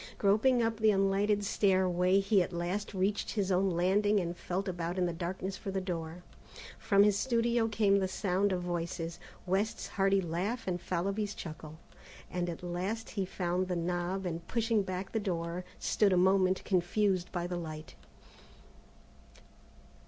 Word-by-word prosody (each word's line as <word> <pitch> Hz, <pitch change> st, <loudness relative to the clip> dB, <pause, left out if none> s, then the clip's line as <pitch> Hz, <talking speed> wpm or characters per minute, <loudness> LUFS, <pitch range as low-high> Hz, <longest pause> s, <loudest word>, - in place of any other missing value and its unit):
Groping 225 Hz, +5 st, +3 dB
up 225 Hz, -1 st, 0 dB
the 220 Hz, 0 st, +4 dB
unlighted 200 Hz, +1 st, +2 dB
stairway, 185 Hz, -2 st, +3 dB
he 195 Hz, 0 st, +3 dB
at 175 Hz, -, -2 dB
last 180 Hz, +4 st, -3 dB
reached 195 Hz, +2 st, 0 dB
his 200 Hz, -3 st, 0 dB
own 190 Hz, +1 st, +3 dB
landing 195 Hz, +4 st, +2 dB
and 175 Hz, -1 st, -3 dB
felt 185 Hz, +3 st, -3 dB
about 175 Hz, -1 st, -3 dB
in 180 Hz, -, +2 dB
the 175 Hz, -, -1 dB
darkness 185 Hz, +3 st, -4 dB
for -, -, -6 dB
the 190 Hz, 0 st, -1 dB
door. 175 Hz, -2 st, -5 dB, 0.6 s
From 200 Hz, -3 st, +4 dB
his 205 Hz, -1 st, +4 dB
studio 235 Hz, 0 st, +1 dB
came 205 Hz, -2 st, +3 dB
the 190 Hz, -, 0 dB
sound 195 Hz, +1 st, 0 dB
of 180 Hz, -1 st, -1 dB
voices, 170 Hz, -1 st, -3 dB, 0.3 s
West's 195 Hz, +4 st, -1 dB
hearty 195 Hz, -1 st, +2 dB
laugh 190 Hz, +7 st, -2 dB
and 175 Hz, -2 st, -2 dB
Fallowby's 200 Hz, +4 st, -2 dB
chuckle, 155 Hz, -1 st, -8 dB, 0.5 s
and 175 Hz, -1 st, -1 dB
at 170 Hz, +1 st, -6 dB
last 185 Hz, +6 st, -3 dB
he 195 Hz, -3 st, -1 dB
found 180 Hz, 0 st, -1 dB
the 180 Hz, -, -1 dB
knob 175 Hz, +2 st, -2 dB
and, 170 Hz, -1 st, -4 dB
pushing 225 Hz, -2 st, +1 dB
back 185 Hz, 0 st, -4 dB
the 225 Hz, -, 0 dB
door, 175 Hz, -3 st, -3 dB
stood 205 Hz, -3 st, +2 dB
a -, -, +3 dB
moment 185 Hz, 0 st, +3 dB
confused 185 Hz, 0 st, +1 dB
by 175 Hz, -2 st, -2 dB
the 175 Hz, 0 st, -3 dB
light. 155 Hz, -2 st, -7 dB
190 Hz, 160 wpm, -31 LUFS, 175-205 Hz, 0.6 s, the